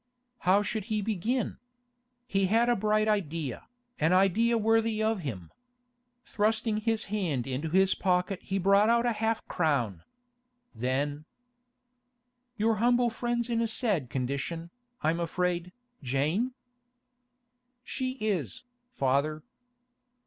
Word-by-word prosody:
How 200 +2 +5
should 205 0 -3
he 215 -1 -1
begin? 220 +4 -1 0.7
He 195 -5 +1
had 230 +4 +3
a 240 - +4
bright 215 +1 +1
idea, 165 - -2 0.3
an 160 +3 +3
idea 210 +5 +3
worthy 225 0 +2
of 220 -1 +1
him. 100 - -6 0.7
Thrusting 220 +1 0
his 225 0 0
hand 160 - -1
into 135 +4 -3
his 190 +3 +4
pocket 180 0 0
he 195 - -2
brought 200 +3 +4
out 235 +1 +3
half 225 -1 0
a - - -44
crown. 130 - 0 0.7
Then: 140 +5 -2 1.3
'Your 220 0 +2
humble 240 +1 +3
friend's 240 +1 -1
in 230 -1 0
a 230 - +1
sad 210 - 0
condition, 140 +7 -3 0.3
I'm 160 +2 +1
afraid, 175 +1 -1 0.3
Jane?' 155 - 0 1.3
'She 255 0 -3
is, 215 - -2 0.3
father. 145 - 0
195 Hz, 120 wpm, -29 LUFS, 155-225 Hz, 1.3 s, How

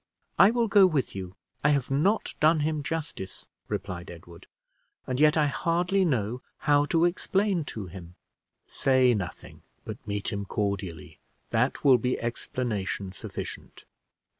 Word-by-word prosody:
"I 195 - +9
will 235 0 +1
go 200 -2 +6
with 150 -8 -1
you. 95 -1 -6 0.3
I 145 - +5
have 140 -3 +1
not 190 +11 +1
done 155 +1 +4
him 155 0 0
justice," 150 - -5 0.2
replied 90 -1 -5
Edward; 85 0 -12 0.6
"and 130 0 -2
yet 150 +1 +5
I 150 - +4
hardly 175 +6 +1
know 125 - -1 0.2
how 145 -1 +3
to 165 +2 +2
explain 190 0 0
to 110 -7 -6
him." 90 -1 -11 0.5
"Say 130 -2 +3
nothing, 95 -5 -6 0.2
but - - -8
meet 100 0 -2
him 100 0 -2
cordially; 95 -5 -3 0.3
that 120 +4 +1
will 135 -4 +6
be 125 +3 -1
explanation 110 -5 -3
sufficient." 95 - -8
130 Hz, 140 wpm, -27 LUFS, 100-160 Hz, 0.6 s, I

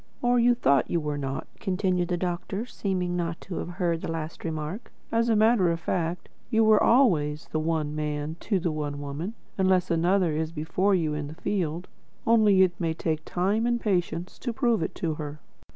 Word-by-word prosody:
'" - - -36
"Or 245 0 +4
you 240 +1 +5
thought 140 - +2
you 170 - +1
were 150 -2 -3
not," 135 -1 -3
continued 185 -2 0
the 175 0 -1
doctor, 180 +4 -3
seeming 185 -6 -2
not 170 -1 -2
to 185 - -6
have - - -4
heard 175 -2 -1
the - - -4
last 160 0 -5
remark. 160 +6 -4 0.2
"As 230 +1 +2
a 225 - +4
matter 215 -4 +4
of 165 - -2
fact, 170 +1 -2 0.2
you 225 -2 +3
are 215 - +6
always 160 - +3
the 155 - 0
One 155 -2 -1
Man 150 0 -2
to 200 -3 0
the 170 -1 -1
One 145 -2 -3
Woman, 145 +9 -5 0.2
unless 185 -1 +3
another 175 +1 +2
is 160 +1 -1
before 175 +5 +1
you 160 -4 0
in 150 -1 -3
the 155 - -9
field. 175 -2 -2 0.4
Only 215 -4 +5
it 175 -2 0
may 165 -1 0
take 155 -1 -2
time 200 +6 0
and 240 0 +1
patience 180 -4 -1
to 245 - -2
prove 235 -4 +1
it 160 - -3
to 165 -3 -1
her." 150 0 -6
175 Hz, 200 wpm, -27 LUFS, 155-200 Hz, 0.4 s, are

